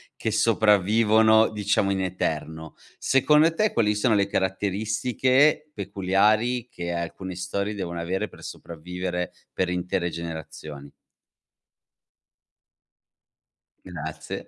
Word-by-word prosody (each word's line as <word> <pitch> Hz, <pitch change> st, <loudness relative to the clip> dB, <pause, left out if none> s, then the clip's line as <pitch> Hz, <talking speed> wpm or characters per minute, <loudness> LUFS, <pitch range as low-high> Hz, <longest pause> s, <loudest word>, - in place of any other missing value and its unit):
che 110 Hz, -, -2 dB
sopravvivono, 110 Hz, +1 st, +4 dB
diciamo, 105 Hz, -2 st, 0 dB
in 95 Hz, -1 st, -1 dB
eterno. 80 Hz, -3 st, -4 dB, 0.2 s
Secondo 150 Hz, +4 st, +4 dB
te, 215 Hz, +2 st, +1 dB
quali 105 Hz, -2 st, +2 dB
sono 110 Hz, +2 st, +2 dB
le 100 Hz, -1 st, +2 dB
caratteristiche 110 Hz, +10 st, +1 dB
peculiari 110 Hz, +4 st, +1 dB
che 85 Hz, 0 st, -5 dB
alcune 85 Hz, +2 st, -5 dB
storie 100 Hz, +3 st, -3 dB
devono 85 Hz, -4 st, -5 dB
avere 95 Hz, +5 st, -2 dB
per -, -, -16 dB
sopravvivere 90 Hz, +2 st, -5 dB, 0.2 s
per 90 Hz, -1 st, -1 dB
intere 90 Hz, 0 st, -1 dB
generazioni? 80 Hz, -3 st, -8 dB, 2.9 s
Grazie, 80 Hz, -4 st, -7 dB
100 Hz, 95 wpm, -25 LUFS, 90-110 Hz, 2.9 s, sopravvivono